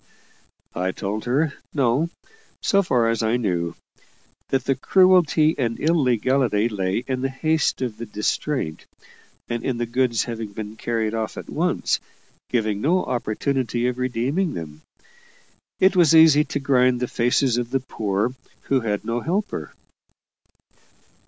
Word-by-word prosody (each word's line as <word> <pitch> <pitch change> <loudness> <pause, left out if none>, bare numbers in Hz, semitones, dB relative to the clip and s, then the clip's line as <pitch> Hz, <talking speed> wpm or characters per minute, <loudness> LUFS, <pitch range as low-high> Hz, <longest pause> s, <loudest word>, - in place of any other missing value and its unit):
I 95 +1 -1
told 105 +1 -4
her, 140 +5 +1 0.2
no, 140 +4 +2 0.5
so 200 - +3
far 125 -10 +1
as 115 -1 0
I 110 +2 +1
knew. 90 -7 -1 0.7
That 135 -1 0
the 135 - +2
cruelty 170 0 +4
and 115 -3 -1
illegality 130 -7 +2
lay 95 +1 -1
in 130 -1 -2
the 135 - 0
haste 155 +1 0
of 115 -4 -4
the 115 0 -7
distraint, 105 - -2 0.6
and 120 -1 -3
in 130 -3 -1
the 120 - -1
goods 120 0 +1
having 115 -3 -6
been 105 +1 -6
carried 110 -1 -2
off 110 -1 -3
at - - -8
once, - - 0 0.5
giving 110 -4 0
no 180 +7 +2
opportunity 120 0 -1
of 125 0 -2
redeeming 130 +8 -1
them. 75 -2 -7 1.0
It 190 +1 +4
was 165 -3 +5
easy 155 -2 +7
to 140 - -3
grind 130 -3 +3
the 125 - -1
faces 120 +1 +1
of 120 -1 -3
the 135 +1 0
poor, 110 -2 -2 0.3
who 135 - +1
had 105 -3 -2
no 115 +1 -1
helper. 190 - -3
125 Hz, 145 wpm, -23 LUFS, 110-140 Hz, 1.0 s, easy